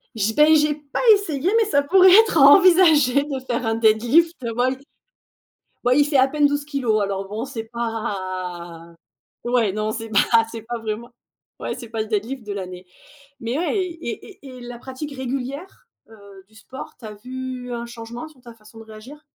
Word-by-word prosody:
J 220 +1 0
ben, 305 +4 +5
j'ai 300 0 +3
pas 290 -1 -7
essayé 355 -4 -1
mais 450 - +3
ça 285 -9 +1
pourrait 370 +4 +6
être 430 -3 +6
envisagé 300 -3 +6
de 280 -3 -4
faire 245 -1 -2
un 225 0 0
deadlift 235 +10 +3
ouais, 245 +3 -1 1.1
bah, 250 +1 +3
il 290 +1 +4
fait 285 -2 +1
à 260 +1 +5
peine 295 0 +2
12 290 0 -1
kilogrammes 240 -8 0
alors, 195 0 -4
bon, 220 +6 -5
c'est 230 -5 -6
pas 185 -7 -5 0.5
ouais, 240 -5 +1
non, 215 +1 -2
c'est 225 0 -6
pas 210 -1 +3 0.3
c'est 225 -2 -8
pas 240 +1 -5
vraiment 225 +2 -5 0.5
ouais, - - -4
c'est 235 -3 -10
pas 225 -1 -4
le 215 - -2
deadlift 220 +3 -3
de 205 - -4
l'année 180 -2 -7 0.5
mais 240 +5 -3
ouais 355 +5 -1
et 340 - -6
et - - -13
et - - -12
la 240 -1 -9
pratique 270 +3 -8
régulière, 270 +6 -6 0.2
heu, 200 -3 -15
du 220 - -26
sport, 255 +4 -10
tu 235 - -17
as 210 - -8
vu 255 +2 -7
un 235 0 -5
changement 235 +5 -9
sur 285 -5 -22
ta 235 -2 -13
façon 220 0 -17
de 225 - -11
réagir 220 +8 -13
245 Hz, 190 wpm, -21 LUFS, 220-285 Hz, 1.1 s, pourrait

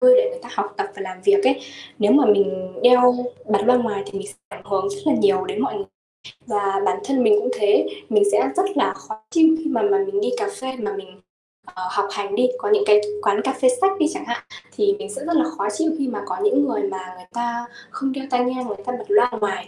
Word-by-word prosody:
Ừ, - - +7
để - - +4
người - - -7
ta - - -11
học - - -3
tập 405 -1 -2
và - - -5
làm 185 -1 -8
việc 400 0 +4
ấy. - - +2 0.4
Nếu 210 -1 +3
mà 285 -3 +5
mình 200 -3 +2
đeo 250 0 +6 0.3
bật 210 -2 +1
loa 250 +1 +5
ngoài 220 -5 -1
thì 195 - -6
mình 200 - -7
sẽ 205 - -10
ảnh - - -12
hưởng 200 - -1
rất 400 - -6
là 305 - +4
nhiều 385 +3 +2
đến 400 +1 -4
mọi - - -2
người. 400 - -4 0.6
Và 200 -3 0
bản - - 0
thân 265 -2 +1
mình 420 - +5
cũng 425 - -2
thế, 435 -3 +2 0.2
mình 420 - +4
sẽ - - +2
rất 370 - +4
là - - +2
khó 220 - -10
chịu 320 -1 +5
khi 320 - -8
mà - - 0
mà 405 -1 +3
mình 400 0 -2
đi 425 - +1
cà 410 - -1
phê 260 0 -4
mà 205 -2 -3
mình, 195 0 -11 0.4
ờ, 185 0 -7
học 200 -1 0
hành 200 0 -4
đi, 250 - +3
có - - -3
những 425 0 +4
cái 210 0 +6 0.2
quán 205 0 +1
cà 265 - 0
phê - - +5
sách 385 0 +4
đi 320 - +3
chẳng 375 - -6
hạn 235 0 -4 0.3
thì 405 -1 +2
mình 430 - -7
sẽ 275 - -7
rất 335 0 0
là 310 - +3
khó 200 - -1
chịu 325 -1 +1
khi 275 - -1
mà 250 - -4
có - - -4
những 290 -9 +3
người 235 -4 -2
mà 185 -2 -5
người 180 0 -15
ta 235 0 -3 0.2
không 270 0 -3
đeo 270 0 -5
tai 250 -1 +2
nghe, 255 0 -2
người 210 -4 -6
ta 250 - -3
bật - - -9
loa 410 -11 +4
ngoài, 195 -2 -2
250 Hz, 265 wpm, -21 LUFS, -, 0.6 s, Ừ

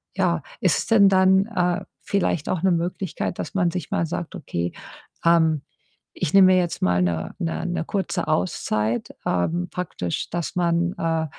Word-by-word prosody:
ja, - - +1 0.2
ist - - +3
es - - -3
denn 205 -3 +6
dann, 190 +1 +4
äh, 180 -3 0 0.2
vielleicht 180 -6 0
auch 175 - -1
'ne 190 - +4
Möglichkeit, 175 +1 -2
dass - - -5
man 175 -3 +2
sich 180 -5 -5
mal 165 - +1
sagt: 170 +1 -5
„Okay, 85 0 -3 0.5
ähm, 160 -3 +4 0.5
ich - - -3
nehme 185 -1 +8
mir - - +4
jetzt 175 -2 -2
mal 90 0 +3
'ne 85 -2 -1
'ne 165 -3 -2
'ne 175 -2 -1
kurze 195 -3 -2
Auszeit“, 115 - -1 0.2
ähm, 165 - 0
praktisch, 160 - -3
dass 170 -2 -3
man, 170 0 +1
äh, 165 -1 0
170 Hz, 170 wpm, -23 LUFS, 155-185 Hz, 0.5 s, nehme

